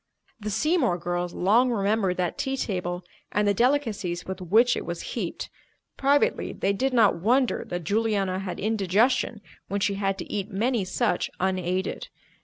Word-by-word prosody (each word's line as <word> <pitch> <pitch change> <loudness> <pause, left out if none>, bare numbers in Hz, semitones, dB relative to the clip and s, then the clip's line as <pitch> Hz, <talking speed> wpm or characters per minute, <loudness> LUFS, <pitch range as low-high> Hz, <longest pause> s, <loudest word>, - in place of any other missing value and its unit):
The 210 0 -4
Seymour 270 - +2
girls 175 0 -2
long 230 +7 +4
remembered 200 -4 +1
that 180 -1 -1
tea 270 0 -2
table 180 -5 -3 0.3
and 210 0 +1
the 205 - +4
delicacies 225 -8 0
with 190 0 -6
which 220 +8 +4
it - - -3
was - - -5
heaped. - - -4 0.5
Privately, 285 - +2
they 195 - 0
did 265 +7 0
not 225 -8 +4
wonder 250 +5 +2
that 175 -1 -4
Juliana 200 -1 0
had 190 -2 -5
indigestion 215 +2 +1 0.3
when 200 +2 -2
she 200 +1 +1
had 195 -1 -1
to - - -7
eat 205 0 -2
many 225 +1 0
such 180 -1 0
unaided. 185 0 -1
200 Hz, 160 wpm, -26 LUFS, 185-235 Hz, 0.5 s, long